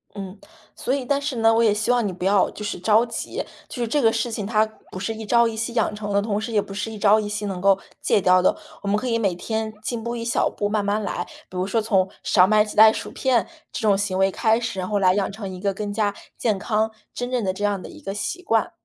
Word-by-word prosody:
嗯。 195 0 -7 0.4
所 255 - -2
以 275 -2 -1
但 280 +2 +1
是 280 -4 -3
呢， 225 0 +4
我 230 +1 +3
也 215 -2 +4
希 220 +3 0
望 245 -2 +2
你 - - -2
不 180 0 -5
要 195 0 +4
就 210 - -8
是 205 - -3
着 220 +5 +4
急， 230 -1 -4 0.3
就 245 - -5
是 235 - 0
这 290 +5 +1
个 225 -3 +5
事 240 - -1
情 215 -2 -3
它 215 +1 +3 0.3
不 185 - -6
是 225 +3 -2
一 220 0 -7
朝 235 +2 +4
一 225 - -4
夕 230 +2 -3
养 225 -3 +1
成 205 -1 -5
的， 200 0 +3
同 205 0 -1
时 225 +2 -4
也 210 -2 +3
不 195 - -9
是 210 +3 -3
一 220 - -7
朝 210 +1 +5
一 210 - -3
夕 210 0 -3
能 190 -3 -4
够 195 0 +4 0.2
戒 - - +3
掉 185 0 +5
的。 185 - +3 0.3
我 200 - -6
们 205 - +2
可 255 - -3
以 230 -1 +1
每 195 -5 +1
天 220 +4 -3
进 235 -2 -3
步 235 +1 -3
一 230 - -4
小 235 - +1
步， 205 - -2
慢 210 -1 0
慢 205 +2 0
来。 175 -3 -3 0.2
比 185 - -8
如 185 +1 -1
说 225 +3 +1
从 195 -4 +2
少 180 -2 +5
买 215 +1 +5
几 210 - -8
袋 220 +1 +9
薯 - - -5
片 250 -6 +1 0.2
这 - - -5
种 210 -3 +3
行 195 -2 -1
为 190 0 +3
开 220 +3 +2
始， 230 -5 -3
然 185 - -3
后 205 -1 +1
来 185 -1 +4
养 200 0 0
成 200 -1 -6
一 180 - -8
个 200 +1 0
更 205 +1 -4
加 205 -1 0 0.2
健 215 -4 +1
康， 220 +2 0 0.2
真 245 0 -4
正 250 -3 0
的 190 -1 0
这 205 - -6
样 205 -2 0
的 - - -9
一 - - -13
个 195 - -4
习 210 - -4
惯。 225 +1 +1
210 Hz, 310 characters per minute, -23 LUFS, 200-225 Hz, 0.4 s, 袋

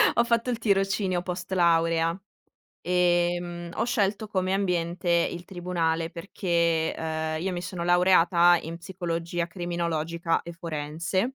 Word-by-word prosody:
ho 235 - +4
fatto 235 +1 +1
il 240 - 0
tirocinio 195 -3 +1
post 180 +1 -6
laurea, 165 -1 +2 0.7
ehm, 175 -1 +1
ho - - 0
scelto 215 -3 0
come 185 -2 -1
ambiente 175 -2 -1
il 170 0 +1
tribunale, 170 -3 -2
perché, 170 -3 0
uhm, 160 0 -2
io 190 +2 -2
mi 175 0 -4
sono 175 -1 -5
laureata 175 -1 +5
in 165 +2 -6
psicologia 170 -2 -3
criminologica 170 -1 -2
e 170 - -8
forense. 165 - -3
175 Hz, 125 wpm, -26 LUFS, 165-185 Hz, 0.7 s, laureata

